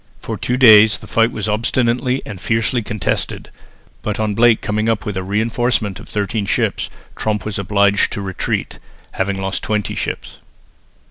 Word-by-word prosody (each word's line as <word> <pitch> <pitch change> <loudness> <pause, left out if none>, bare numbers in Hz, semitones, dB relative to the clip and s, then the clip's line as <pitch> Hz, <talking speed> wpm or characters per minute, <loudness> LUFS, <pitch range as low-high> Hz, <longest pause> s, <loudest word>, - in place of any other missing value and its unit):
For - - -5
two 125 - -1
days 110 -4 +7
the - - -12
fight 115 +1 +2
was 105 -1 -4
obstinately 120 +4 0
and 100 -4 -8
fiercely 115 +2 0
contested, 105 -4 -3 0.5
but 105 -1 -3
on 110 -1 0
Blake 115 +1 +4
coming 110 +2 -1
up 110 -2 0
with 105 - -3
a 95 - -1
reinforcement 110 +1 -1
of - - -13
thirteen 105 0 -2
fresh - - +2
ships, - - -1 0.3
Tromp 105 -3 -2
was 105 -2 -3
obliged 100 +1 +2
to 100 - -4
retreat, 95 -1 -3 0.3
having 95 0 -2
lost 95 0 -2
twenty 105 -1 -1
ships. - - -5
105 Hz, 165 wpm, -18 LUFS, 100-115 Hz, 0.5 s, days